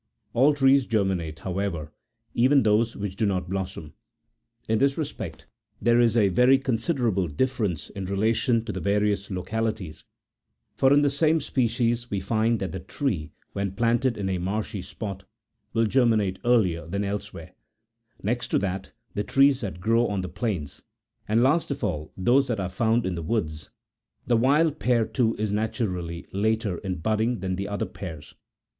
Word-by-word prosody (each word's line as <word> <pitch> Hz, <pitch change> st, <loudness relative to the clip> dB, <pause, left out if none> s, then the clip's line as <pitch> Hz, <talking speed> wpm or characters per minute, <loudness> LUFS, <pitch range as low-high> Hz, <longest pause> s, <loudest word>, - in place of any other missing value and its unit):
All 140 Hz, +5 st, +4 dB
trees 135 Hz, -1 st, +4 dB
germinate, 95 Hz, -8 st, -1 dB
however,81 90 Hz, -5 st, -3 dB, 0.4 s
even 130 Hz, +3 st, +4 dB
those 110 Hz, +2 st, +2 dB
which 100 Hz, -2 st, -4 dB
do 110 Hz, +1 st, +1 dB
not 95 Hz, -3 st, -1 dB
blossom. 95 Hz, -5 st, -5 dB, 0.7 s
In 110 Hz, 0 st, +2 dB
this 140 Hz, 0 st, +2 dB
respect 155 Hz, -3 st, -5 dB, 0.3 s
there 120 Hz, +2 st, +3 dB
is 120 Hz, -1 st, +3 dB
a 105 Hz, -3 st, +4 dB
very 125 Hz, +8 st, +5 dB
considerable 120 Hz, -, 0 dB
differ 120 Hz, -, 0 dB
ence 85 Hz, -7 st, -4 dB
in 100 Hz, -1 st, -5 dB
relation 110 Hz, +4 st, +1 dB
to 110 Hz, -, -3 dB
*the -, -, -4 dB
various 100 Hz, 0 st, 0 dB
localities; 100 Hz, -2 st, -3 dB, 0.7 s
for 135 Hz, -, +4 dB
in 145 Hz, +1 st, +5 dB
the 145 Hz, -, +3 dB
same 155 Hz, +3 st, +2 dB
species 120 Hz, -3 st, 0 dB
we 100 Hz, -, -1 dB
find 110 Hz, +3 st, +1 dB
that 95 Hz, -4 st, -3 dB
the 95 Hz, -, -5 dB
tree, 90 Hz, -, -3 dB, 0.2 s
when 100 Hz, -1 st, -2 dB
planted 120 Hz, +3 st, +1 dB
in 100 Hz, -2 st, -2 dB
a 95 Hz, -1 st, -1 dB
marshy 100 Hz, +2 st, -3 dB
spot, 100 Hz, 0 st, -6 dB, 0.5 s
will 115 Hz, 0 st, +2 dB
germinate 110 Hz, -6 st, +2 dB
earlier 90 Hz, -10 st, +2 dB
than 100 Hz, +4 st, -2 dB
elsewhere; 100 Hz, 0 st, -5 dB, 0.7 s
next 120 Hz, +4 st, -1 dB
to -, -, +1 dB
that, 95 Hz, -1 st, -3 dB, 0.2 s
the 105 Hz, -, -1 dB
trees 135 Hz, +2 st, +4 dB
that 95 Hz, -6 st, -5 dB
grow 115 Hz, +5 st, +2 dB
on 100 Hz, -2 st, -1 dB
the 90 Hz, -, -4 dB
plains, 90 Hz, -, -3 dB, 0.5 s
and 110 Hz, +3 st, +3 dB
last 150 Hz, +6 st, +2 dB
of 140 Hz, -, -4 dB
all 75 Hz, -7 st, -2 dB
those 125 Hz, +8 st, +3 dB
that 115 Hz, -4 st, -1 dB
are 95 Hz, -2 st, -2 dB
found 115 Hz, +5 st, +1 dB
in 95 Hz, -, -1 dB
the 85 Hz, -, -4 dB
woods: 80 Hz, -, -2 dB, 0.6 s
the 120 Hz, -, +2 dB
wild 145 Hz, +6 st, +3 dB
pear, 120 Hz, -2 st, +2 dB
too, 115 Hz, -1 st, 0 dB
is 105 Hz, -1 st, -1 dB
naturally 90 Hz, -6 st, -2 dB
later 105 Hz, -2 st, 0 dB
in 95 Hz, -2 st, -3 dB
budding 110 Hz, +7 st, 0 dB
tli -, -, -6 dB
an 95 Hz, 0 st, -1 dB
the 100 Hz, +2 st, -3 dB
other 100 Hz, 0 st, -2 dB
pears. 80 Hz, -6 st, -9 dB
105 Hz, 170 wpm, -26 LUFS, 95-120 Hz, 0.7 s, very